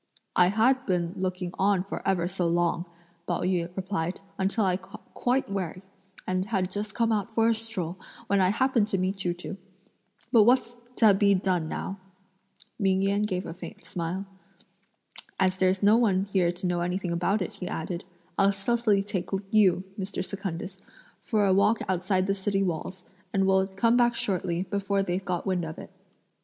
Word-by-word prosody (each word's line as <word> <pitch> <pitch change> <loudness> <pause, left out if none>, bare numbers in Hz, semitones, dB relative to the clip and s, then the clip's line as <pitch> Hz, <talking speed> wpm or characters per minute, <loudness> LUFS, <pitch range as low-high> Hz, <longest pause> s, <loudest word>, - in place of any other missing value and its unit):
"I 180 - +6
had 240 +7 +3
been 175 -2 0
looking 185 -1 -3
on 195 -1 +3
for 195 - -5
ever 175 -3 +2
so 180 -1 -1
long," 170 0 +1 0.4
Pao - - -1
yü 180 -2 0
replied, 185 -2 -2 0.2
"until 195 +3 +1
I 185 -1 +2
got 190 +1 -14
quite 255 +2 +1
weary; 185 -2 -4 0.4
and 185 0 0
had 190 -4 -1
just 205 +1 -4
come 230 -1 +2
out 215 +1 -1
for 225 0 +4
a - - +4
stroll, 205 -6 -4 0.3
when 200 0 +2
I 185 - +4
happened 235 0 +2
to 195 - 0
meet 190 +1 -1
you 175 -1 0
two. 180 +2 -7 0.7
But 235 -4 +7
what's 240 0 +2 0.2
to 220 -3 +6
be 200 0 +4
done 180 -4 0
now?" 195 +1 -4 0.8
Ming 190 -2 +2
Yen 200 +1 +2
gave 190 -3 -1
a - - -5
faint 180 - -10
smile. 180 +1 -3 1.1
"As 185 -1 +2
there's 185 +1 +2
no 210 +3 +6
one 195 -5 +3
here 190 -3 +2
to 175 +1 -6
know 175 -1 0
anything 180 0 -2
about 185 +4 +1
it," 215 - -6
he 180 - -5
added, 170 +1 -4 0.4
"I'll 195 0 +5
stealthily 205 0 +1
take 195 -3 -3 0.2
you, 190 -5 +4 0.2
Mr. 190 0 -3
Secundus, 190 -1 -5 0.4
for 215 -5 +1
a 190 - +4
walk 210 +3 +4
outside 185 0 +1
the 195 - +1
city 195 0 0
walls; 180 +1 -4 0.3
and 195 -1 +2
we'll 190 0 +3
come 230 +5 +2
back 240 -1 +3
shortly, 180 -4 -1
before 200 0 -1
they've 185 0 -2
got 180 -2 -2
wind 185 -3 0
of 160 -1 -6
it." - - -10
190 Hz, 180 wpm, -27 LUFS, 180-205 Hz, 1.1 s, But